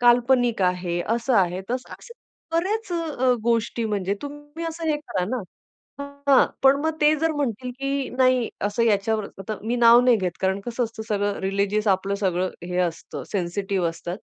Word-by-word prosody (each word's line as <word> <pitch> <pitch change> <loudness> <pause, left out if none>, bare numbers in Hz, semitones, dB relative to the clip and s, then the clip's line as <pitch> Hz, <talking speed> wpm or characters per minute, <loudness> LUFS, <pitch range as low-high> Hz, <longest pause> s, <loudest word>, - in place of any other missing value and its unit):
काल्पनिक 245 -2 +4
आहे, 180 -1 0
असं 235 +3 0
आहे. 180 -1 +2
तसं 250 0 -3
तर - - -6
अशा 470 -8 -7
बऱ्याच 405 +2 -2
अ, 320 -6 -2
अ, 255 - +5
गोष्टी 230 0 0
म्हणजे 200 -2 -1
तुम्ही 290 +3 -8
असं 330 0 -6
हे 305 - +2
करा 200 -11 -3
ना. 240 - -3 0.9
हां, 270 - +6 0.2
पण 270 +1 +6
मग 320 - +1
ते 300 +1 +5
जर 325 +2 +1
म्हणतील, 255 -4 -2
की 275 0 -1
नाही, 255 -2 +3 0.2
असं 205 +3 0
याच्यावर. 215 -1 +1
आता 205 +2 -5
मी 235 +2 0
नाव 235 0 +7
नाही 245 -1 +5
घेत, 185 -4 -1
कारण 190 +1 0
कसं 240 +3 -2
असतं, 225 -1 -7
सगळं 205 -1 0
रिलिजियस 200 +2 0
आपलं 195 +1 +1
सगळं 185 -1 +1 0.2
हे 180 - -3
असतं, 170 -2 -3
सेन्सिटिव्ह 190 -1 -1
असतात. 175 +3 -6
230 Hz, 180 wpm, -24 LUFS, 195-270 Hz, 0.9 s, नाव